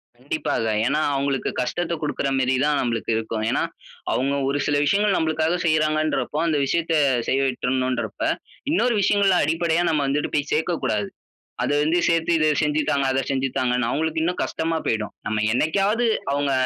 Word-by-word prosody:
கண்டிப்பாக 110 -1 -2
ஏன்னா, 150 +5 +1
அவுங்களுக்கு 135 -1 -1
கஷ்டத்த 170 +6 -2
கொடுக்கிற 150 -2 -2
மேரி 130 0 +1
தான் 150 -1 +2
நம்பளுக்கு 115 -2 -2
இருக்கும். 110 -1 -3
ஏன்னா, - - +1 0.5
அவுங்க 135 +2 0
ஒரு 140 +1 0
சில 145 - +1
விஷயங்கள் 200 +5 +2
நம்மளுக்காக 160 +2 0
செய்றாங்கன்றப்போ, 155 -1 +1
அந்த 155 -2 +1
விஷயத்த 165 +3 0 0.3
செய்ய 135 - +1
விட்றனும் 130 0 -1
இன்றப்ப, 120 - -5 0.5
இன்னொரு 245 -7 +2
விஷயங்கள்ல 195 -2 +3
அடிப்படையா 165 +2 +1
நம்ம 150 -3 +1
வந்துட்டு 145 +2 -1
போய் 145 0 -1
சேர்க்க 160 +2 0
கூடாது. 105 -2 -1 0.6
அத - - -1
வந்து 160 +4 +2
சேர்த்து, 165 0 +1
இத 155 - +2 0.2
செஞ்சு 150 +1 +1
தாங்க, 140 -1 +1
அத 135 - +1
செஞ்சு 135 0 0
தாங்கன்னு 125 -1 +1
அவுங்களுக்கு 160 +2 -1
இன்னும் 180 +1 -1
கஷ்டமா 165 0 -2
போயிடும். 110 -2 -1
நம்ம 110 0 -1
என்னைக்காவது 200 - +1 0.3
அவுங்க 140 0 0
150 Hz, 160 wpm, -23 LUFS, 130-165 Hz, 0.6 s, விஷயங்கள்ல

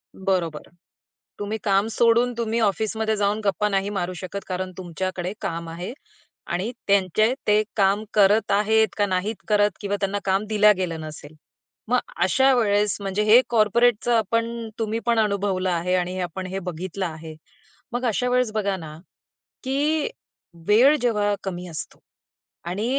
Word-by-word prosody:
बरोबर. 180 -5 -2 0.7
तुम्ही 205 +2 -3
काम 200 +1 +2
सोडून 235 +2 +3
तुम्ही 230 0 -1
ऑफिसमध्ये 220 +1 0
जाऊन 205 +1 0
गप्पा 210 +1 +1
नाही 195 0 0
मारू 185 -2 -2
शकत, 185 +3 -6
कारण 185 0 -3
तुमच्याकडे 185 +1 -4
काम 165 0 -4
आहे 175 +8 -6 0.6
आणि 185 +7 -1 0.2
त्यांचे 200 +4 +3
ते 210 +1 +4
काम 200 +1 +3
करत 210 +1 +4
आहेत 220 +2 +3
का 205 - +3
नाहीत 195 +3 -1
करत 210 -1 +3
किंवा 205 0 -1
त्यांना 200 +1 0
काम 195 +2 +1
दिलं 210 0 +5
गेलं 170 -3 -2
नसेल. 155 -1 -9 0.5
मग 250 0 +4 0.2
अशा 265 +8 +4
वेळेस, 205 -3 +2
म्हणजे 195 +1 -1
हे 225 +4 +7
कॉर्पोरेटचं 235 +1 +3
आपण 230 +1 -1
तुम्ही 225 +1 -1
पण 235 -1 +3
अनुभवलं 200 -3 0
आहे 175 +1 0
आणि 180 +1 -1
आपण 180 +1 -4
हे 190 +1 -4
बघितलं 185 +1 -4
आहे. 160 -1 -7 0.6
मग 245 +1 -2
अशा 245 +2 0
वेळेस 250 -2 +1
बघा 200 -2 0
ना, 155 -3 -9 0.7
की 290 +4 0 0.6
वेळ 245 +8 +6
जेव्हा 210 -4 +1
कमी 180 -2 -5
असतो. 160 -2 -8 0.7
आणि 190 +6 -3
205 Hz, 150 wpm, -23 LUFS, 185-220 Hz, 0.7 s, हे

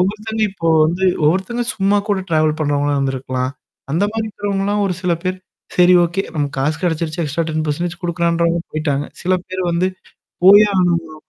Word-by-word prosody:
ஒவ்வொத்தவங்க 215 +4 -1
இப்போ 165 -4 -3 0.2
வந்து 175 +4 0 0.2
ஒவ்வொருத்தங்க 190 +10 +1
சும்மா 200 0 +2
கூட 205 -2 +1
ட்ராவல் 155 -1 +2
பண்றவங்களாம் 145 -1 0
இருந்திருக்கலாம்? 130 -1 -2 0.4
அந்த 170 +7 +1
மாரி 225 0 -2
இருக்கிறவங்கலாம் 205 0 -1
ஒரு 185 - -1
சில 180 -2 +1
பேர். 185 0 -2 0.4
சரி 180 0 +6
ஓகே. 175 +3 -1
நம்ம 145 -2 0
காசு 150 +3 0
கிடைச்சிருச்சு, 165 -2 -1
எக்ஸ்ட்ரா 155 +3 -2
10% 155 +2 -2
குடுக்குறான்ன்றவங்க 170 -1 0
போயி்ட்டாங்க. 145 -2 -1 0.2
சில 185 +1 +2
பேர் 185 0 -4
வந்து 170 +2 +1 0.6
போயே 205 +3 +8
ஆகணும்ங்குற 170 -3 +1
170 Hz, 155 wpm, -18 LUFS, 155-190 Hz, 0.6 s, போயே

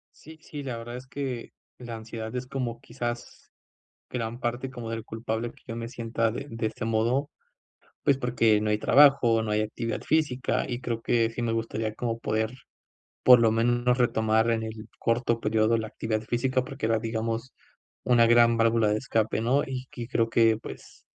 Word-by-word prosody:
Sí, 160 +1 -14
sí, 150 -2 -8
la 125 -4 -4
verdad 120 +1 -7
es 130 - -11
que 130 -3 -5 0.3
la 120 -2 -7
ansiedad 110 +1 -7
es 125 0 -3
como 125 -4 -3
quizás 120 -1 -6 0.6
gran 120 0 -4
parte 120 +2 -2
como 120 -3 -7
del 115 -1 -4
culpable 110 +1 -3
que - - -23
yo 115 - -5
me 115 0 -4
sienta 115 -1 -1
de 140 +5 -5
de 115 0 -2
este 110 0 -4
modo, 115 +6 +1 0.7
pues, 140 -2 +3
porque 115 -4 +2
no 105 0 0
hay 105 - +2
trabajo, 135 -3 +5
no 110 - -3
hay 105 0 +2
actividad 115 +2 -3
física, 145 -5 +1
y 120 -1 -3
creo 115 -2 -3
que 115 -1 +2
sí 120 +1 -5
me 115 -1 0
gustaría 115 -1 -2
como 115 0 -2
poder, 110 0 -1 0.7
por 125 -1 +9
lo 115 -1 +4
menos, 120 +2 +2
retomar 110 -1 +2
en 115 -1 0
el 110 0 -7
corto 115 0 +1
periodo 110 +1 +2
la 110 -1 -3
actividad 110 0 -2
física, 125 +3 0
porque 135 -4 -4
era, 115 -1 +2
digamos, 115 +2 -3 0.5
una 120 -2 +5
gran 120 0 +5
válvula 115 -1 +3
de 105 +1 +1
escape 110 -3 0
¿no? 130 +5 +2
Y 130 -1 -6
y 120 -2 -5
creo 115 -3 +1
que, 115 -1 +4
pues, - - -11
115 Hz, 185 wpm, -27 LUFS, 110-125 Hz, 0.7 s, por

